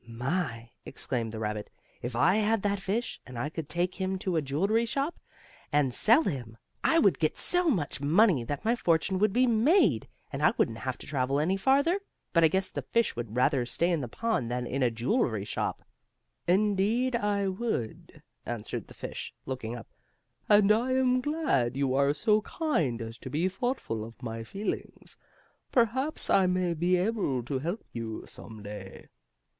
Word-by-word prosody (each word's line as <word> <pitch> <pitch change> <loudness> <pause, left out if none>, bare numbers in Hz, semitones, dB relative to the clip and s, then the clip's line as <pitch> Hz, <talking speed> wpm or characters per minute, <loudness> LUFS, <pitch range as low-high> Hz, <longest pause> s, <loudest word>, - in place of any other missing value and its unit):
"My!" 120 -1 -3
exclaimed 115 -4 -2
the 110 - -6
rabbit. 105 -1 -3 0.3
"If 120 0 -4
I 180 - +4
had 220 -1 +1
that 200 -1 0
fish, 210 +5 -3
and 125 -2 -10
I 145 +5 -2
could 155 -1 -6
take 180 +3 -1
him 190 0 0
to 185 -1 -2
a 160 - +2
jewelry 195 +12 +1
shop, 280 +7 -2 0.5
and 145 -3 +2
sell 235 - +5
him, 120 - -4 0.3
I 325 - +4
would 195 - +4
get 155 -2 0
so 355 -1 +2
much 160 - -1
money 165 - +4
that 145 - -4
my 230 +2 +3
fortune 175 -2 +1
would 210 0 +3
be 250 +5 +3
made, 230 - +3 0.3
and - - -3
I - - +4
wouldn't 115 0 +1
have 130 0 -3
to - - -10
travel 135 -1 0
any 170 +6 +1
farther. 280 - +3 0.3
But 170 -2 +5
I - - +8
guess 190 +4 -1
the - - -3
fish 235 0 0
would 115 -2 -5
rather 130 +1 +3
stay 170 +7 +1
in 165 -3 +1
the 125 - -4
pond 220 - -1
than 125 0 -2
in 135 +3 -2
a 125 - +4
jewelry 115 - 0
shop." 105 - -3 0.6
"Indeed, 210 +6 +2
I 205 -3 0
would," 190 - -4 0.2
answered 115 -3 -5
the - - -14
fish, - - -7
looking 120 -3 -4
up. 115 - -9 0.6
"And 205 -1 +6
I 240 +4 +2
am 255 -1 +3
glad 250 - 0
you 135 -2 +1
are 140 +2 +3
so 215 +4 +3
kind 165 - -1
as 115 +1 -8
to - - -7
be 160 +7 +1
thoughtful 195 - -2
of 115 +3 -11
my 115 -1 -4
feelings. 195 - -5 0.6
Perhaps 260 +5 +1
I 190 -1 +4
may 180 -1 +1
be 175 +3 +2
able 180 - 0
to 130 +2 -2
help 175 - -3
you, 115 -2 -5
some 110 -2 -11
day." 100 -2 -9
170 Hz, 180 wpm, -29 LUFS, -, 0.6 s, I